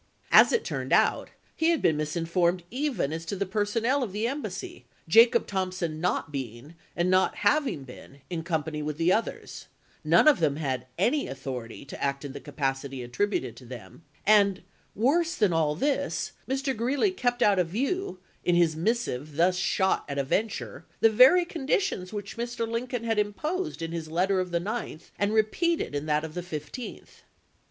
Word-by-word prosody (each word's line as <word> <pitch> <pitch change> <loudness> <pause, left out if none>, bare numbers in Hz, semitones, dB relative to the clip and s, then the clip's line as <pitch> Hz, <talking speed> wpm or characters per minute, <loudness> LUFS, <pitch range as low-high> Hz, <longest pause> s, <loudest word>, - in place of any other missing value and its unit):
As - - +8
it 470 - +1
turned - - -4
out, - - +3 0.3
he 325 +1 +2
had 335 -2 +2
been 160 - +2
misinformed 170 +3 0
even 250 - -1
as 165 +1 -4
to 180 - -3
the 200 +1 -1
personnel 220 +7 0
of 220 -7 -3
the 210 +2 -1
embassy, 280 +4 -5 0.2
Jacob 230 +8 +6
Thompson 185 -5 -3
not 175 -3 -1
being, 130 +1 -6 0.2
and 175 +2 +1
not 185 0 +3
having 235 - +1
been, 135 +2 -13
in 170 -3 -4
company 160 -2 -2
with 150 0 -4
the 170 +3 +3
others; 225 - -3 0.4
none - - +5
of 300 - +6
them 150 -4 +2
had 130 -4 -3
any 285 +4 +1
authority 130 -3 -6
to - - -8
act 140 +1 -1
in 135 - -6
the 140 - -7
capacity 135 -2 -3
attributed 120 - -2
to 130 - -12
them; 120 - -10 0.2
and, 200 -3 +4 0.3
worse 325 - +2
than 205 - +2
all 155 -2 +1
this, 280 - -1 0.2
Mr. 270 0 -1
Greeley 270 - +1
kept 245 -9 0
out 200 -2 +4
of 180 - +2
view, 270 - -2 0.3
in 175 - +2
his 170 -2 +3
missive 160 - -2
thus 175 +3 +3
shot 190 +1 +1
at 140 - -4
a 140 - +1
venture, 205 +10 -2 0.2
the 225 - +6
very 265 +11 +7
conditions 300 - -1
which 205 -1 -6
Mr. 235 -1 -3
Lincoln 235 +1 -3
had 225 -2 0
imposed 300 - -2
in 165 - -4
his 165 -2 -4
letter 185 +4 +1
of 185 0 -2
the 170 - 0
9th 205 -4 -5
and 205 +1 +1
repeated 220 - +1
in 145 +1 -3
that 150 0 +1
of 160 -1 -6
the 180 - -4
15th. 175 - -8
185 Hz, 180 wpm, -27 LUFS, 155-235 Hz, 0.4 s, As